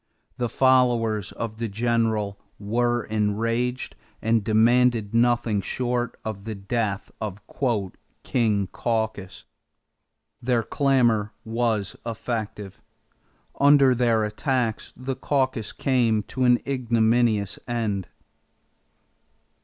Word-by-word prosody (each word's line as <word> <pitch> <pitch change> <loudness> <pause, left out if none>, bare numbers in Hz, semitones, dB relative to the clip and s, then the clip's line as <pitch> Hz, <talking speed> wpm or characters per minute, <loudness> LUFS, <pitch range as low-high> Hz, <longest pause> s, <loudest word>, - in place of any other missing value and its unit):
The 120 -1 0
followers 120 -6 +2
of 110 -1 -5
the 115 - -1
General 110 -2 0 0.2
were 120 +3 0
enraged 115 +4 -1 0.2
and 115 -1 +1
demanded 115 0 +3
nothing 115 -3 +2
short 120 +3 -2
of 105 -3 -5
the 110 0 -5
death 100 0 -2
of 105 -2 -4 0.8
"King 110 -5 +1
Caucus." 110 -5 -3 1.0
Their 120 -1 +1
clamor 120 -7 +2
was 110 -3 -1
effective. 110 -3 -5 0.8
Under 140 -2 +6
their 115 -3 +2
attacks, 115 +1 -1
the 130 +1 -4
caucus 130 -6 -1
came 115 -5 +1
to 130 +4 -2
an 125 -1 +6
ignominious 115 -5 +1
end. 110 -6 -2
115 Hz, 95 wpm, -24 LUFS, 105-125 Hz, 1.0 s, Under